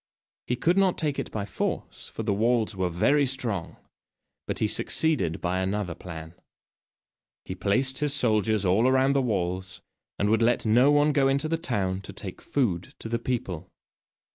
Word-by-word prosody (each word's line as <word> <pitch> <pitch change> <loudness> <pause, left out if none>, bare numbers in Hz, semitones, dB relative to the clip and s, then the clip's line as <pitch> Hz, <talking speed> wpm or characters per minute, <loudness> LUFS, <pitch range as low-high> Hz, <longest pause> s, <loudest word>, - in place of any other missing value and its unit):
He 125 - 0
could 175 +9 +2
not 190 -2 +2
take 150 -3 0
it - - -4
by 105 -2 -3
force, 100 - -4
for 115 - -6
the 105 -2 0
walls 115 0 +1
were 95 -1 0
very 140 - +2
strong, 115 -9 -2 0.7
but - - -2
he - - +1
succeeded 150 - +1
by 90 +1 -1
another 95 -1 -2
plan. 80 -1 -9 1.1
He - - -5
placed 130 +8 0
his 150 -1 +1
soldiers 110 -6 +3
all 110 +8 +3
round 130 +1 +3
the 140 - +2
walls, 95 -5 -2 0.3
and 100 - +1
would 110 0 +3
let 115 +1 +2
no 120 +5 +5
one 145 +1 +4
go 140 -2 +3
into 140 +3 +1
the 165 - 0
town 95 - -1
to - - -9
take - - -8
food 95 -11 -1
to 115 - -7
the 115 0 -1
people. 95 -9 -4
115 Hz, 175 wpm, -26 LUFS, 95-135 Hz, 1.1 s, no